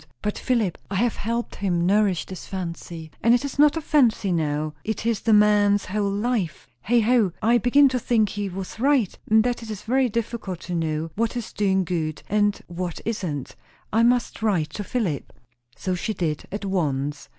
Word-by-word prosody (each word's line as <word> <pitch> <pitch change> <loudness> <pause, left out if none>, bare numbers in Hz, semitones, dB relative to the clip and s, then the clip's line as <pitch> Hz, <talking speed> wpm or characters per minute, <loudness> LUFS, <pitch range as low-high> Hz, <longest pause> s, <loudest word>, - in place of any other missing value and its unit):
But 210 0 -1
Philip? 230 -9 0
I 200 - -3
have 230 +4 +1
helped 235 +2 -3
him 175 -4 0
nourish 195 -2 +2
this 185 -3 -9
fancy 170 -3 -6
and 230 +1 +5
it 245 - -1
is 280 0 -6
not 300 +2 +5
a - - -2
fancy 240 -10 +2
now 155 -2 -1
it 220 0 -3
is 230 -3 +1
the 225 - 0
man's 210 -1 +4
whole 200 +1 -1
life. 200 - -2
Heigh 235 - +3
ho! 220 -5 +3
I 235 +2 +3
begin 280 +5 +5
to 255 -1 -1
think 220 -3 +2
he 205 0 -3
was 190 +3 -7
right, 265 -6 +2
and 220 0 +5
that 245 0 -1
it 225 - -9
is 210 -1 -6
very 255 +2 +2
difficult 220 -5 -3
to 180 - -6
know 160 -1 -2
what 230 +2 -1
is 235 - -5
doing 190 -2 +2
good 160 -3 -3
and 205 0 +1
what 175 -1 -5
isn't. 180 - -3 0.4
I 225 - +4
must 240 0 +2
write 180 -9 +1
to 205 - -5
Philip 190 - -2 0.4
So 185 - -2
she 210 +4 -2
did, 155 -4 -2
at 205 +1 -4
once. 145 -6 -2
205 Hz, 195 wpm, -24 LUFS, 175-230 Hz, 0.4 s, and